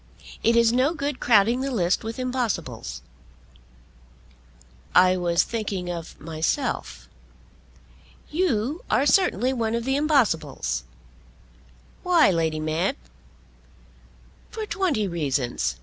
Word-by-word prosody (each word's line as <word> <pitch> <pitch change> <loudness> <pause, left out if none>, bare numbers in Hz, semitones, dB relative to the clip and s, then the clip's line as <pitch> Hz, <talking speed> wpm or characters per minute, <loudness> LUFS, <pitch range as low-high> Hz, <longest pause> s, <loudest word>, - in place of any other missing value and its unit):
It 230 - +3
is 235 0 +4
no 265 +7 +2
good 285 -2 -3
crowding 230 +2 +3
the 275 - -2
list 185 -8 0
with 225 +1 -5
impossibles." 170 - -3 1.9
"I 185 0 +6
was 175 -2 +2
thinking 195 -6 -3
of 170 -2 -7
myself." 165 - -3 1.2
"You 300 - 0
are 275 - +2
certainly 290 -7 +3
one 230 -2 -1
of 235 0 -3
the 270 +1 +1
impossibles." 160 - 0 1.2
"Why, 345 - +4
Lady 160 -2 0
Mab?" 160 - -1 1.5
"For 440 -1 -5
twenty 330 - 0
reasons. 140 - -1
225 Hz, 100 wpm, -24 LUFS, 165-265 Hz, 1.9 s, I